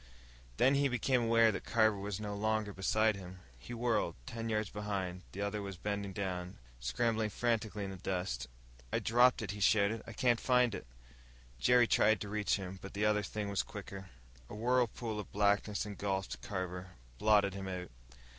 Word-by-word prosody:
Then 125 +5 +5
he 140 0 +3
became 125 0 +1
aware 115 -1 +5
that 100 - -5
Carver 110 -2 +3
was 100 0 -4
no 105 -1 -4
longer 110 0 0
beside 110 +3 +2
him. 95 -1 -10 0.2
He 60 - -11
whirled. 115 -7 0
Ten 115 - -4
yards 105 -2 -1
behind, 100 -3 -3
the 100 - -6
other 100 +1 -2
was 100 -2 -6
bending 100 0 -3
down, 90 -1 -4 0.2
scrabbling 110 - 0
frantically 110 -2 -1
in 95 - -4
the 95 - -7
dust. 90 -9 -3 0.4
"I - - +2
dropped 120 +1 +4
it!" 100 - -3
he 105 - -7
shouted. 105 +2 +3
"I 115 - -7
can't 120 0 +2
find 125 -3 +3
it!" 65 - -6 0.7
Jerry 125 - +5
tried 110 -2 +4
to 105 - -4
reach 105 0 +1
him, 95 -1 -6
but 95 - -9
the 105 +1 +1
other 105 0 +3
thing 105 +1 -4
was 100 - +1
quicker. 95 -1 -8 0.4
A - - -7
whirlpool 120 -1 0
of 105 - -7
blackness 105 0 +1
engulfed 100 -2 -3
Carver, 95 -3 -5 0.3
blotted 105 -2 +4
him 95 0 -5
out. 90 -1 -5
105 Hz, 180 wpm, -34 LUFS, 95-115 Hz, 0.7 s, Then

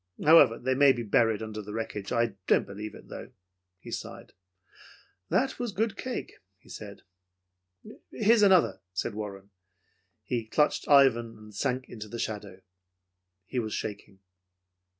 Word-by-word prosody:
However, 145 -7 +7
they 130 +1 0
may 135 0 +6
be 120 - -4
buried 110 0 +2
under 110 -1 -6
the 105 0 -8
wreckage. 105 -3 -5
I 115 -2 +1
don't - - +4
believe 105 +2 -7
it, - - -14
though." - - -9 0.4
He 90 - -11
sighed. - - -7 1.0
"That 265 0 +1
was 240 -3 -2
good 215 +2 -1
cake," 255 +3 -6 0.2
he 95 - -23
said. 100 -2 -9 1.1
"Here's 220 +1 +3
another," 190 -4 +4
said 100 +4 -2
Warren. 100 -2 -7 0.7
He 115 -3 -3
clutched 150 +6 +1
Ivan 120 -5 +4
and 105 0 -14
sunk 130 +4 -2
into 110 -2 -8
the 115 - -7
shadow. 100 -4 -5 0.8
He 125 - -3
was 110 -2 -3
shaking. 100 -2 -6
115 Hz, 145 wpm, -28 LUFS, 105-140 Hz, 1.1 s, However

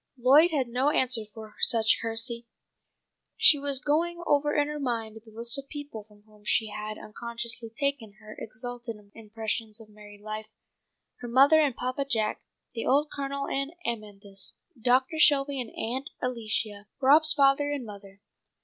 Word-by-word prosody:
Lloyd 275 +7 +6
had 280 -6 0
no 250 +4 +1
answer 250 -6 +2
for 220 0 -11
such 225 -3 +3
heresy. 230 +1 -1 0.9
She 295 - +7
was 280 -1 0
going 330 +4 0
over 295 -1 +2
in 290 -1 +2
her 300 0 -5
mind 225 -5 -3
the 225 - -17
list 235 +4 -1
of 275 - -10
people 290 -8 -8
from 210 -1 -22
whom 210 -1 -22
she 220 +1 +1
had 215 +1 -6
unconsciously 235 +1 -5
taken 240 -3 -3
her 215 0 -13
exalted 240 +1 -6 0.2
impressions 220 0 -4
of 220 -1 -14
married 205 -1 -15
life: 215 0 -6 0.7
her 245 - -7
mother 275 +6 +6
and 280 -5 +1
Papa 255 +3 -2
Jack, 220 -5 -1 0.3
the 230 - -4
old 290 +3 +2
Colonel 280 0 -4
and 275 +3 -2
Amanthis, 205 -4 -4 0.3
Doctor 260 +7 +2
Shelby 280 -3 +4
and 235 - -7
Aunt 260 +5 -3
Alicia, 215 -4 -3
Rob's 305 +4 +6
father 280 0 +3
and 285 -4 -3
mother. 200 -1 -12
235 Hz, 160 wpm, -27 LUFS, 220-280 Hz, 0.9 s, She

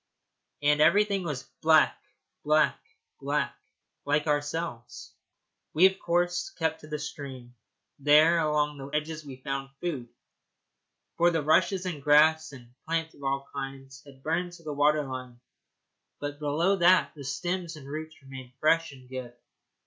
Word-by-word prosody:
And 150 +1 +4
everything 200 +4 +4
was 150 -6 -4 0.2
black, 160 -1 +5 0.5
black, 155 0 +2 0.4
black - - -1 0.5
like 150 +1 +1
ourselves. 145 -4 -3 0.6
We 170 +4 +7
of 190 0 +3
course 175 +1 0
kept 160 -1 -1
to 155 - -12
the 150 0 -3
stream. 135 -4 -8 0.5
There 155 +4 +5
along 150 -2 0
the 135 - -7
edges 150 +2 -3
we 140 -3 -9
found 135 +1 -4
food, 140 -9 -4 1.1
for 170 +1 +5
the 165 -3 0
rushes 180 +5 +2
and 170 -6 -4
grass 155 +2 +4
and 120 -3 -14
plants 165 0 -1
of 140 - -16
all 135 0 -1
kinds 135 -1 -7
had 135 -2 -17
burned 175 +3 -1
to 170 - -14
the 150 -2 -4
water 150 +1 +3
line, 130 -2 -7 0.8
but 145 0 -5
below 160 +7 +1
that 180 +1 +4
the 145 - -10
stems 170 +5 -3
and 145 -3 -11
roots 155 +1 -7
remained 130 -2 -10
fresh 165 +2 +2
and 130 -2 -15
good. 125 -2 -7
150 Hz, 150 wpm, -28 LUFS, 135-165 Hz, 1.1 s, We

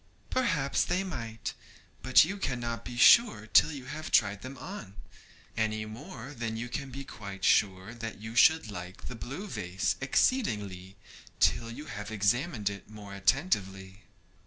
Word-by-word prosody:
'Perhaps 165 - +1
they 180 +2 0
might, 115 -12 -5 0.5
but 130 +4 +6
you 190 +5 -4
cannot 120 -8 -3
be 120 - -7
sure 125 - +6
till 150 +7 +5
you 135 -4 -7
have 150 +4 -6
tried 100 -2 +3
them 130 +1 -8
on, 125 - -8 0.6
any 110 -1 -1
more 125 +4 -9
than 115 -3 -4
you 120 +2 -4
can 140 +1 -4
be 135 +2 -7
quite 100 -7 -7
sure 95 +1 +2
that 115 -3 -6
you 110 +2 -8
should 160 -2 +5
like 90 -1 -8
the 125 - -6
blue 135 - -6
vase 95 - -2
exceedingly 105 - 0 0.4
till 115 - +3
you 135 +6 -8
have 105 -6 -6
examined 110 - 0
it 100 0 -4
more 105 -2 -10
attentively.' 95 - 0
115 Hz, 155 wpm, -30 LUFS, 100-140 Hz, 0.6 s, but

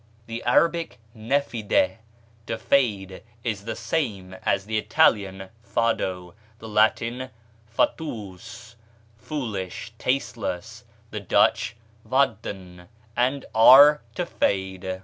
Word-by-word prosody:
The 115 +1 -6
Arabic 165 -5 +2 0.2
nafida, 110 -6 0 0.5
to 115 - -2
fade, 100 -8 0 0.2
is 105 -4 -3
the 115 -1 -4
same 110 - -3
as 95 - 0
the 110 0 -1
Italian 95 -3 +2
fado, 95 -7 -1 0.2
the 115 - -10
Latin 115 +4 +1 0.4
fatuus 115 - -4 0.4
(foolish, 110 - -5
tasteless), 115 -4 -3 0.3
the 105 - -4
Dutch 100 +3 +2 0.3
vadden, 100 -9 -2 0.3
and 130 +3 0
our 140 +6 +8
to 180 - -1
fade. 95 - -2
110 Hz, 95 wpm, -24 LUFS, 95-125 Hz, 0.5 s, our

